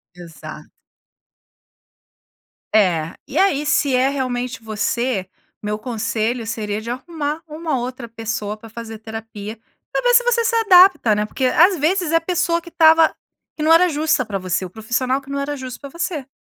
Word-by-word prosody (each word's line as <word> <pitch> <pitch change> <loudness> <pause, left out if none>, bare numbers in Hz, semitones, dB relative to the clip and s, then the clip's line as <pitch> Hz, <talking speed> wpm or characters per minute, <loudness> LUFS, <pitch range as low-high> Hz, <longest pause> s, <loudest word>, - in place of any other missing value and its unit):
Exato. 170 -3 -10 2.1
É, 170 -6 +2
e - - -5
aí 300 -7 +2
se 285 -3 +2
é 255 +2 +3
realmente 255 -3 -3
você, 220 -1 -2 0.4
meu 210 0 -2
conselho 225 0 -2
seria 215 -2 -3
de 230 +2 -5
arrumar 300 +3 -4
uma 310 -3 -3
outra 245 0 -5
pessoa 220 -2 -4
pra 225 +1 -13
fazer 225 0 -8
terapia, 220 -1 -8 0.3
pra - - 0
ver - - +3
se - - +6
você 480 -1 +2
se 465 +1 +1
adapta, 370 - +6
né. 210 0 0
Porque 260 +5 -3
às 345 +8 +4
vezes 335 +2 +1
é - - +2
a - - 0
pessoa 340 0 0
que 345 - -12
tava 320 -1 +5 0.4
que 305 - -4
não 320 +1 +5
era 350 +2 +6
justa 305 -3 +1
pra 205 -2 -3
você, 185 0 -2
o - - -8
profissional 250 +6 -1
que 270 - -16
não 280 - -2
era 285 +1 -3
justo 255 -2 -7
pra 280 - -9
você. 335 -3 -4
255 Hz, 175 wpm, -20 LUFS, 220-320 Hz, 2.1 s, se